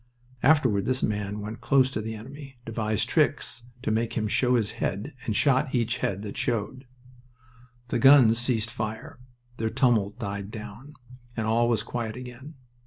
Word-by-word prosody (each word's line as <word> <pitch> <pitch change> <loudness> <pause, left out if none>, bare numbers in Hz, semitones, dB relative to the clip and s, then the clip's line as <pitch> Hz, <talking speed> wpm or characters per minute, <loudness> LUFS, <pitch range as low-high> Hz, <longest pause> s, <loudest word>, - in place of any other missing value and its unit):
Afterward 125 -9 +3
this 130 +1 0
man 105 0 -2
went 110 +2 -7
close 135 -2 +3
to 110 - -3
the 110 +1 -5
enemy, 135 +4 -10
devised 110 -2 -1
tricks 120 - +1 0.2
to 110 - 0
make 115 +1 0
him 110 -2 -1
show 125 +4 +2
his 110 -3 +1
head, 105 +10 -2
and 110 - 0
shot 135 0 +2
each 120 +1 0
head 100 -2 -2
that 105 - -6
showed. 125 +3 -2 1.0
The - - 0
guns 130 -5 +7
ceased 115 -2 0
fire. 110 +2 -5 0.4
Their 110 0 -1
tumult 115 -5 +2
died 100 -3 -4
down, 110 +6 -9 0.4
and 110 - -1
all 115 +2 +2
was 110 -3 +1
quiet 115 -2 -4
again. 125 +4 -9
115 Hz, 165 wpm, -26 LUFS, 110-130 Hz, 1.0 s, guns